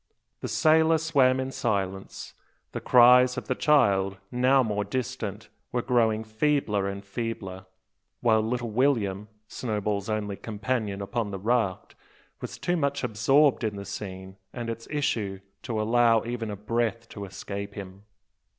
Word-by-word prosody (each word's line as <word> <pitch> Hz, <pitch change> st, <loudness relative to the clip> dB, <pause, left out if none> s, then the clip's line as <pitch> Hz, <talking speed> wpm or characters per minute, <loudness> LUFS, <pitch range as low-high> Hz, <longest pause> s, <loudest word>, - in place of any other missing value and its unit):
The -, -, -4 dB
sailor 160 Hz, +1 st, +4 dB
swam 140 Hz, -5 st, +3 dB
in 130 Hz, 0 st, -3 dB
silence, 95 Hz, -6 st, -3 dB, 0.4 s
the -, -, -5 dB
cries 125 Hz, +1 st, +6 dB
of -, -, -5 dB
the 130 Hz, -, +1 dB
child, 100 Hz, -10 st, +3 dB
now 130 Hz, +2 st, +4 dB
more 105 Hz, -3 st, -1 dB
distant, 110 Hz, -2 st, -4 dB, 0.2 s
were 120 Hz, -1 st, -1 dB
growing 110 Hz, -3 st, +2 dB
feebler 110 Hz, -3 st, 0 dB
and 100 Hz, 0 st, -7 dB
feebler; 100 Hz, -3 st, -5 dB, 0.5 s
while 110 Hz, -2 st, +3 dB
little 120 Hz, +1 st, -2 dB
William 105 Hz, -5 st, +1 dB, 0.2 s
Snowball's 105 Hz, -3 st, -2 dB
only 105 Hz, -2 st, -2 dB
companion 105 Hz, -2 st, -3 dB
upon 115 Hz, +1 st, -2 dB
the 100 Hz, -, -4 dB
raft 110 Hz, -2 st, -1 dB, 0.5 s
was -, -, -7 dB
too 175 Hz, -, 0 dB
much 140 Hz, -2 st, -1 dB
absorbed 125 Hz, +5 st, +3 dB
in 110 Hz, -2 st, -1 dB
the 100 Hz, 0 st, -7 dB
scene 95 Hz, -2 st, -7 dB
and 120 Hz, -2 st, -4 dB
its 115 Hz, 0 st, -8 dB
issue 110 Hz, -10 st, -1 dB, 0.2 s
to 115 Hz, -4 st, -3 dB
allow 115 Hz, +1 st, +3 dB
even 120 Hz, -1 st, -4 dB
a 105 Hz, -, -4 dB
breath 115 Hz, +2 st, -2 dB
to 100 Hz, -2 st, -7 dB
escape 100 Hz, +1 st, -6 dB
him. 95 Hz, -1 st, -9 dB
115 Hz, 145 wpm, -27 LUFS, 100-125 Hz, 0.5 s, cries